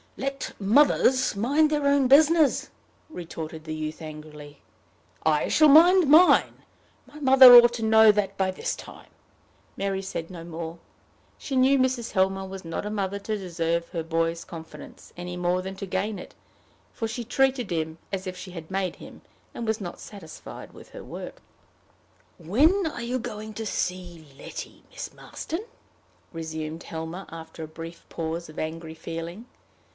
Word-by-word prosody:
"Let 275 Hz, 0 st, -4 dB
mothers 260 Hz, +3 st, +3 dB
mind 285 Hz, +9 st, +2 dB
their 295 Hz, -2 st, 0 dB
own 280 Hz, -2 st, +3 dB
business!" 305 Hz, +2 st, +4 dB, 0.4 s
retorted 160 Hz, -, -7 dB
the 155 Hz, -, -5 dB
youth 155 Hz, 0 st, -5 dB
angrily. 150 Hz, -2 st, -10 dB, 0.6 s
"I 155 Hz, -1 st, +2 dB
shall 310 Hz, -, +5 dB
mind 340 Hz, +2 st, +7 dB
mine. 330 Hz, +5 st, +5 dB, 0.4 s
My 300 Hz, -, -13 dB
mother 260 Hz, -3 st, +9 dB
ought 240 Hz, 0 st, +9 dB
to 225 Hz, -, -4 dB
know 220 Hz, 0 st, +7 dB
that 200 Hz, -2 st, -2 dB
by 190 Hz, -1 st, +1 dB
this 185 Hz, -, -3 dB
time." -, -, -13 dB, 0.7 s
Mary 195 Hz, -1 st, -2 dB
said 180 Hz, -4 st, -5 dB
no 175 Hz, -3 st, -9 dB
more. 165 Hz, 0 st, -7 dB, 0.6 s
She 275 Hz, -, -5 dB
knew 260 Hz, +2 st, +4 dB
Mrs. 255 Hz, -3 st, 0 dB
Helmer 190 Hz, 0 st, +1 dB
was 190 Hz, -1 st, -9 dB
not 165 Hz, +4 st, -4 dB
a -, -, -3 dB
mother 200 Hz, -1 st, -2 dB
to 215 Hz, +2 st, -3 dB
deserve 170 Hz, -3 st, -2 dB
her 165 Hz, -2 st, -4 dB
boy's 165 Hz, +1 st, -1 dB
confidence, 160 Hz, -1 st, -11 dB
any 180 Hz, 0 st, -6 dB
more 180 Hz, +1 st, 0 dB
than 190 Hz, +1 st, -6 dB
to 195 Hz, -, -5 dB
gain 195 Hz, +3 st, -2 dB
it; -, -, -11 dB, 0.6 s
for 225 Hz, -, -4 dB
she 235 Hz, +2 st, -5 dB
treated 260 Hz, -1 st, +1 dB
him 160 Hz, -1 st, -2 dB
as 190 Hz, -1 st, -4 dB
if 185 Hz, -, -5 dB
she 185 Hz, 0 st, -9 dB
had 165 Hz, -3 st, -9 dB
made 190 Hz, -1 st, -2 dB
him, -, -, -13 dB, 0.3 s
and 230 Hz, -, -5 dB
was 220 Hz, +1 st, 0 dB
not 180 Hz, -4 st, -7 dB
satisfied 180 Hz, -7 st, -11 dB
with -, -, -14 dB
her -, -, -10 dB
work. -, -, -9 dB, 1.0 s
"When 300 Hz, -, +2 dB
are 240 Hz, -6 st, -5 dB
you 245 Hz, +2 st, -1 dB
going 215 Hz, -2 st, -6 dB
to 225 Hz, +1 st, -5 dB
see 175 Hz, -5 st, -4 dB
Letty, -, -, -9 dB
Miss -, -, -7 dB
Marston?" 335 Hz, +6 st, -6 dB, 0.7 s
resumed 160 Hz, 0 st, -5 dB
Helmer, 165 Hz, +4 st, -6 dB
after 160 Hz, 0 st, -9 dB
a -, -, -6 dB
brief 165 Hz, +2 st, -10 dB
pause 165 Hz, 0 st, -4 dB
of 155 Hz, -, -9 dB
angry 160 Hz, 0 st, -5 dB
feeling. 165 Hz, +7 st, -7 dB
190 Hz, 160 wpm, -26 LUFS, 165-245 Hz, 1.0 s, mother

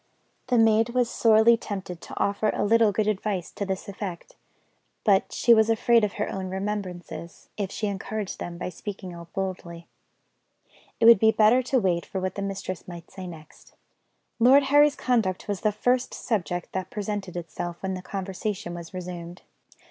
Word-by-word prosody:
The 250 Hz, -1 st, +2 dB
maid 225 Hz, +1 st, +3 dB
was 245 Hz, -2 st, +2 dB
sorely 225 Hz, +1 st, +5 dB
tempted 190 Hz, -5 st, -6 dB
to -, -, -8 dB
offer 200 Hz, +2 st, +1 dB
a -, -, 0 dB
little 225 Hz, 0 st, +4 dB
good 210 Hz, +1 st, 0 dB
advice 205 Hz, -3 st, -2 dB
to 200 Hz, -, -4 dB
this 190 Hz, +2 st, -3 dB
effect; 195 Hz, -3 st, -7 dB, 0.7 s
but 200 Hz, -3 st, +3 dB
she 235 Hz, -, +4 dB
was 220 Hz, 0 st, +4 dB
afraid 230 Hz, +1 st, +4 dB
of 210 Hz, -1 st, 0 dB
her 210 Hz, -, -2 dB
own 190 Hz, -1 st, -4 dB
remembrances, 190 Hz, -3 st, -5 dB
if 200 Hz, -2 st, -3 dB
she 215 Hz, -, -3 dB
encouraged 205 Hz, 0 st, -4 dB
them 170 Hz, 0 st, -6 dB
by 180 Hz, -, -4 dB
speaking 190 Hz, 0 st, -7 dB
out 170 Hz, -1 st, -11 dB
boldly. 175 Hz, -3 st, -5 dB, 1.1 s
It 230 Hz, -, +3 dB
would 230 Hz, -3 st, +9 dB
be 220 Hz, -, +5 dB
better 220 Hz, +4 st, +5 dB
to 255 Hz, +1 st, +1 dB
wait 180 Hz, -5 st, +1 dB
for 190 Hz, -, -4 dB
what 185 Hz, 0 st, -2 dB
the 200 Hz, -, -5 dB
mistress 195 Hz, -2 st, -5 dB
might 170 Hz, -2 st, -10 dB
say 190 Hz, -1 st, -8 dB
next. 155 Hz, -3 st, -13 dB, 0.7 s
Lord 260 Hz, +4 st, +7 dB
Harry's 290 Hz, +2 st, +5 dB
conduct 220 Hz, -8 st, 0 dB
was 200 Hz, -2 st, -3 dB
the 215 Hz, -, +2 dB
first 245 Hz, +4 st, 0 dB
subject 175 Hz, -6 st, -2 dB
that 185 Hz, -1 st, -4 dB
presented 205 Hz, -3 st, -4 dB
itself 175 Hz, 0 st, -5 dB
when 190 Hz, 0 st, -1 dB
the 185 Hz, -, -5 dB
conversation 195 Hz, -1 st, -4 dB
was 170 Hz, +1 st, -9 dB
resumed. 175 Hz, -1 st, -7 dB
200 Hz, 175 wpm, -26 LUFS, 180-220 Hz, 1.1 s, would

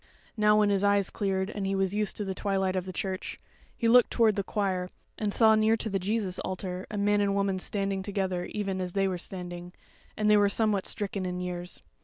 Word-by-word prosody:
Now 210 Hz, -1 st, +4 dB
when 210 Hz, -1 st, +4 dB
his 200 Hz, 0 st, +2 dB
eyes 200 Hz, -1 st, +2 dB
cleared 195 Hz, 0 st, -1 dB
and 200 Hz, -2 st, -3 dB
he 195 Hz, -, 0 dB
was 195 Hz, 0 st, 0 dB
used 210 Hz, -1 st, -1 dB
to 210 Hz, -, -2 dB
the 190 Hz, -, -2 dB
twilight 190 Hz, -1 st, -1 dB
of 185 Hz, 0 st, -2 dB
the -, -, -4 dB
church, 190 Hz, +1 st, -4 dB, 0.4 s
he 230 Hz, -, +1 dB
looked 245 Hz, +1 st, +6 dB
toward 225 Hz, -3 st, +3 dB
the 200 Hz, -, 0 dB
choir, 190 Hz, -3 st, -2 dB, 0.3 s
and 210 Hz, -2 st, 0 dB
saw 220 Hz, +1 st, +5 dB
near 220 Hz, +1 st, +3 dB
to 220 Hz, -, -3 dB
the 195 Hz, -, 0 dB
Jesus 195 Hz, -1 st, -1 dB
altar 185 Hz, 0 st, -4 dB
a 210 Hz, -, -5 dB
man 205 Hz, 0 st, +2 dB
and 200 Hz, -, +2 dB
a -, -, 0 dB
woman 195 Hz, -1 st, 0 dB
standing 195 Hz, 0 st, -1 dB
together 190 Hz, -2 st, -2 dB
even 195 Hz, -3 st, -3 dB
as 180 Hz, -1 st, -4 dB
they 195 Hz, -1 st, +2 dB
were 185 Hz, -2 st, -2 dB
standing, 175 Hz, -1 st, -7 dB, 0.4 s
and 215 Hz, -, +1 dB
they 210 Hz, 0 st, +6 dB
were 205 Hz, -1 st, +4 dB
somewhat 210 Hz, -2 st, +1 dB
stricken 200 Hz, -1 st, -3 dB
in 180 Hz, 0 st, -3 dB
years. 180 Hz, 0 st, -5 dB
195 Hz, 230 wpm, -28 LUFS, 185-210 Hz, 0.4 s, looked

